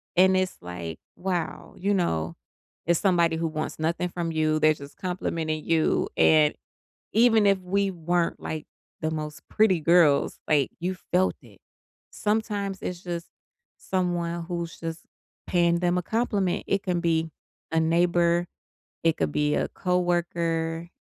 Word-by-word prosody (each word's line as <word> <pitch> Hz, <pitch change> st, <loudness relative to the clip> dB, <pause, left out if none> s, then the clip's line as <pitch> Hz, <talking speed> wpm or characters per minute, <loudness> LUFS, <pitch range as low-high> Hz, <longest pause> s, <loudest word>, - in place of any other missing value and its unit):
and 190 Hz, +1 st, +5 dB
it's 185 Hz, 0 st, -1 dB
like, 90 Hz, -2 st, -6 dB, 0.2 s
"Wow," 180 Hz, -2 st, -3 dB
you 200 Hz, +2 st, 0 dB
know, 85 Hz, -, 0 dB, 0.5 s
it's 170 Hz, 0 st, +3 dB
somebody 170 Hz, -4 st, +3 dB
who 165 Hz, 0 st, -1 dB
wants 155 Hz, -1 st, -4 dB
nothing 170 Hz, +3 st, 0 dB
from 170 Hz, -1 st, -3 dB
you, 155 Hz, -1 st, +1 dB
they're 155 Hz, 0 st, +5 dB
just 140 Hz, -1 st, -12 dB
complimenting 165 Hz, -4 st, -2 dB
you, 165 Hz, -1 st, +2 dB
and 155 Hz, -1 st, +5 dB, 0.6 s
even 225 Hz, -2 st, +5 dB
if 195 Hz, -1 st, +4 dB
we 195 Hz, +2 st, 0 dB
weren't, 175 Hz, -1 st, 0 dB
like, 155 Hz, -1 st, -5 dB, 0.3 s
the 155 Hz, -, -1 dB
most 155 Hz, -1 st, -5 dB
pretty 200 Hz, -6 st, +3 dB
girls, 160 Hz, -3 st, +4 dB
like, 145 Hz, -4 st, +3 dB
you 185 Hz, +2 st, -2 dB, 0.2 s
felt 185 Hz, +1 st, +3 dB
it, -, -, -18 dB, 0.5 s
sometimes 210 Hz, -2 st, -1 dB
it's 180 Hz, -1 st, -4 dB
just 170 Hz, -2 st, -4 dB, 0.5 s
someone 175 Hz, -2 st, -2 dB
who's 170 Hz, -1 st, -5 dB
just 165 Hz, 0 st, -5 dB, 0.5 s
paying 170 Hz, -1 st, +3 dB
them 180 Hz, 0 st, +2 dB
a -, -, -1 dB
compliment. 205 Hz, -3 st, 0 dB
It 195 Hz, 0 st, 0 dB
can 180 Hz, -2 st, -1 dB
be 165 Hz, -1 st, +1 dB, 0.4 s
a 160 Hz, -, +3 dB
neighbor. 170 Hz, +1 st, +2 dB, 0.6 s
It 165 Hz, -1 st, +3 dB
could 80 Hz, -2 st, 0 dB
be 150 Hz, 0 st, +1 dB
a -, -, 0 dB
coworker, 170 Hz, -2 st, -1 dB
170 Hz, 145 wpm, -26 LUFS, 160-180 Hz, 0.6 s, and